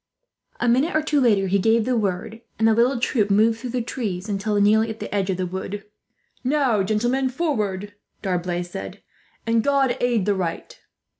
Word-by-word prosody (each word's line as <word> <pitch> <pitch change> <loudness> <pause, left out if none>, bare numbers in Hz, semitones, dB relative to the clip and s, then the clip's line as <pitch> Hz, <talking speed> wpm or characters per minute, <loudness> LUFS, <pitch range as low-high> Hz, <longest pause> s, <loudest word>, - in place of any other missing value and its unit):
A 240 - 0
minute 265 +9 +2
or 310 - +2
two 300 -2 +1
later 210 -6 +3
he 195 +1 +1
gave 225 +2 +3
the 255 0 +1
word, 215 +1 -2 0.2
and 225 +1 +3
the 225 - +5
little 240 +3 +2
troop 215 -3 +1
moved 220 +3 +3
through 250 +1 -6
the 245 0 -2
trees 205 -6 -4
until 205 0 -1
nearly 215 +2 +4
at 220 0 -6
the - - -6
edge 195 -1 0
of 185 - 0
the 185 - -1
wood. 190 +3 -5 0.6
"Now, 260 -5 +2
gentlemen, 240 +7 0
forward," 210 - -2 0.3
D'Arblay 180 -2 -1
said, 95 - -8 0.4
"and 230 -1 +2
God 275 -2 +2
aid 240 -5 +1
the 205 - +2
right!" 180 -4 -4
220 Hz, 190 wpm, -23 LUFS, 195-245 Hz, 0.6 s, the